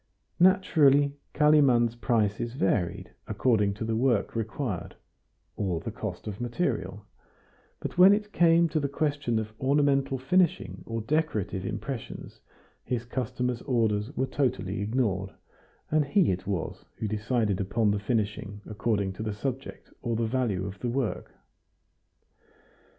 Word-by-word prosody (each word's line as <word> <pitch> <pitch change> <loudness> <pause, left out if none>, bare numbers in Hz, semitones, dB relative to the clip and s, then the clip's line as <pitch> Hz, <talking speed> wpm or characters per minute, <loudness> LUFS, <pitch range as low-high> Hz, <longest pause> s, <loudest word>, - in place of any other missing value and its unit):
Naturally, 150 -7 +5 0.2
Kalimann's 140 -6 +5
prices 115 -1 0
varied 95 -7 -1 0.2
according 105 -6 +2
to 110 - -4
the 110 0 -1
work 120 -3 +1
required, 110 - -3 0.6
or 90 -5 -1
the 115 - -5
cost 105 -4 -6
of 105 0 -6
material; 115 - -2 0.7
but - - -5
when 185 +2 +9
it 210 0 0
came 170 0 +5
to 155 - 0
the 140 -1 -1
question 145 -5 -1
of 110 -1 -3
ornamental 140 0 +2
finishing 130 - +1
or 115 0 -3
decorative 110 - -1
impressions, 135 -5 -6 0.4
his 120 -2 -2
customer's 125 0 -2
orders 110 -3 0
were 130 - +2
totally 120 -8 -1
ignored, 105 -4 0 0.6
and 155 0 +4
he 165 - +3
it 95 +1 -4
was 95 -5 -3
who 110 - -2
decided 105 -1 0
upon 105 +2 +1
the 100 - 0
finishing 105 -2 -2
according 100 -2 -1
to 100 - -8
the 110 -2 -3
subject 135 +4 -5
or 120 -2 -1
the 115 +1 0
value 110 -6 0
of 100 0 -7
the 120 - -2
work. 125 -2 -3
115 Hz, 135 wpm, -28 LUFS, 105-140 Hz, 0.7 s, when